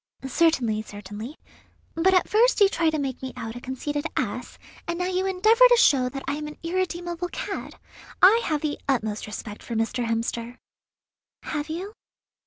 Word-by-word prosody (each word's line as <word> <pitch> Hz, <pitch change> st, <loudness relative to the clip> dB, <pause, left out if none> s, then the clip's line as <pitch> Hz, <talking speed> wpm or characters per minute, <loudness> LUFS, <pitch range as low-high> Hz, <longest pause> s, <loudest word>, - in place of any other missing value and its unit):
"Certainly, 255 Hz, -7 st, +2 dB
certainly; 210 Hz, +6 st, -8 dB, 0.6 s
but 350 Hz, +3 st, +3 dB
at 365 Hz, -, +3 dB
first 465 Hz, +4 st, +4 dB
you 405 Hz, -, +7 dB
try 335 Hz, -4 st, +1 dB
to 315 Hz, -, -1 dB
make 270 Hz, -3 st, -3 dB
me 260 Hz, -1 st, -5 dB
out 225 Hz, 0 st, -5 dB
a 245 Hz, -, -7 dB
conceited 290 Hz, +3 st, -3 dB
ass, -, -, -3 dB, 0.3 s
and 340 Hz, 0 st, -2 dB
now 360 Hz, -, -1 dB
you 370 Hz, +1 st, 0 dB
endeavour 435 Hz, +6 st, +4 dB
to 485 Hz, -, +6 dB
show 260 Hz, -, +4 dB
that 270 Hz, +1 st, -6 dB
I 275 Hz, -, 0 dB
am 300 Hz, 0 st, -5 dB
an 300 Hz, -, -9 dB
irredeemable 350 Hz, 0 st, -2 dB
cad. -, -, -5 dB, 0.4 s
I 430 Hz, +5 st, +7 dB
have 305 Hz, -3 st, 0 dB
the 300 Hz, -2 st, -2 dB
utmost 220 Hz, -6 st, 0 dB
respect 210 Hz, 0 st, -7 dB
for 235 Hz, -, -6 dB
Mr. 230 Hz, +2 st, -1 dB
Hemster." 230 Hz, +1 st, -2 dB, 0.9 s
"Have 300 Hz, 0 st, -3 dB
you? 370 Hz, +6 st, -5 dB
300 Hz, 175 wpm, -25 LUFS, 240-360 Hz, 0.9 s, you